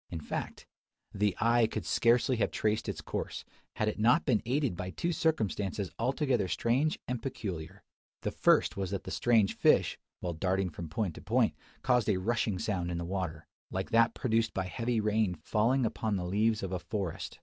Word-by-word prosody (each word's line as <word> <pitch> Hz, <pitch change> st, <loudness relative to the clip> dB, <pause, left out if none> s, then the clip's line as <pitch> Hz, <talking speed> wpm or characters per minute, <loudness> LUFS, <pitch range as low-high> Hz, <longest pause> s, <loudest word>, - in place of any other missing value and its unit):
In 85 Hz, -, -4 dB
fact, 75 Hz, -, -5 dB, 0.5 s
the 100 Hz, -1 st, 0 dB
eye 115 Hz, 0 st, +4 dB
could -, -, -4 dB
scarcely 120 Hz, +2 st, +3 dB
have 110 Hz, -, +1 dB
traced 110 Hz, 0 st, -1 dB
its -, -, -4 dB
course, -, -, -4 dB, 0.3 s
had 110 Hz, -, 0 dB
it 105 Hz, -, -2 dB
not 125 Hz, +9 st, +4 dB
been 120 Hz, -7 st, +2 dB
aided 135 Hz, -5 st, +1 dB
by 90 Hz, +2 st, -4 dB
two 170 Hz, -, -2 dB
circumstances 105 Hz, -, -1 dB
altogether 125 Hz, -3 st, +1 dB
strange 130 Hz, -, +1 dB
and 125 Hz, -2 st, -2 dB
peculiar. 95 Hz, -, -5 dB, 0.4 s
The -, -, -1 dB
first -, -, +3 dB
was 95 Hz, -2 st, -2 dB
that 100 Hz, -1 st, -3 dB
the -, -, -7 dB
strange 115 Hz, -5 st, +3 dB
fish, -, -, +3 dB, 0.2 s
while 90 Hz, -1 st, -3 dB
darting 95 Hz, +2 st, 0 dB
from 80 Hz, +1 st, -7 dB
point 90 Hz, +2 st, -1 dB
to -, -, -10 dB
point, -, -, +2 dB, 0.3 s
caused 125 Hz, -4 st, +3 dB
a 100 Hz, -, +3 dB
rushing 110 Hz, 0 st, 0 dB
sound 90 Hz, -3 st, -2 dB
in 85 Hz, -, -2 dB
the 85 Hz, -, -3 dB
water; 85 Hz, -4 st, -3 dB, 0.2 s
like 95 Hz, +1 st, -4 dB
that 115 Hz, 0 st, +4 dB
produced 115 Hz, -2 st, 0 dB
by 95 Hz, -, -1 dB
heavy 115 Hz, +6 st, -1 dB
rain 105 Hz, -3 st, +1 dB
falling 115 Hz, +8 st, +1 dB
upon 110 Hz, -1 st, -1 dB
the 90 Hz, -2 st, -2 dB
leaves 105 Hz, +4 st, +1 dB
of 95 Hz, -, -3 dB
a 90 Hz, -, -1 dB
forest. 100 Hz, -4 st, -4 dB
105 Hz, 190 wpm, -31 LUFS, 95-115 Hz, 0.5 s, eye